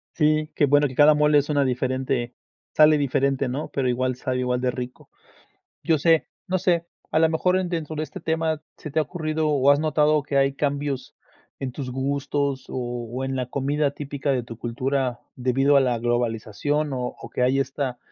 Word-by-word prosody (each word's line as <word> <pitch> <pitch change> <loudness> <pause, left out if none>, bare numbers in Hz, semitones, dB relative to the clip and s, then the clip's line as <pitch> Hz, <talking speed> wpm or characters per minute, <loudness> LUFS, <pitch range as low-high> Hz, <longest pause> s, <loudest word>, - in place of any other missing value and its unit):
Sí. 155 0 +2
Qué 145 - +4
bueno, 145 +1 +4
que 130 - -9
cada 150 +2 +7
mole, 150 0 +4
es 145 +1 +1
una 145 -2 +2
diferente. 130 -1 -1 0.4
Sale 155 0 +6
diferente, 140 -1 +1
¿no? 135 +5 -4
Pero 130 -2 0
igual, 130 +1 0
sabe 130 0 -2
igual 125 0 0
de 125 0 +1
rico. 125 0 -7 0.7
Yo 160 -2 +2
sé. 165 +2 +3 0.2
No 185 -1 0
sé, 170 -2 +1 0.2
a 155 - +2
lo 160 0 +5
mejor 180 +3 +2
en 185 -2 -2
dentro 160 -2 -3
de 155 - -1
este 155 - -7
tema, 160 -1 -1
¿se 155 - -8
te 155 - -1
ha - - +4
ocurrido 155 -1 -2
o 140 -2 +3
has 145 +1 +4
notado, 155 -1 +2
que 140 0 -3
hay 135 0 +3
cambios 140 -2 -2 0.4
en 130 -2 -4
tus 130 -1 -5
gustos? 140 +1 -1
¿O 120 0 -4
en 135 0 -2
la 125 -1 -2
comida 140 +2 0
típica 145 0 -4
de 130 -2 0
tu 115 -1 -10
cultura, 125 +1 -2 0.2
debido 135 +3 +3
a - - +6
la 125 -3 +1
globalización? 120 +5 -1
¿O 125 -1 -3
o, - - -10
¿que - - -2
hay 130 +2 +3
esta, 135 -2 -3
140 Hz, 200 wpm, -24 LUFS, 125-150 Hz, 0.7 s, cada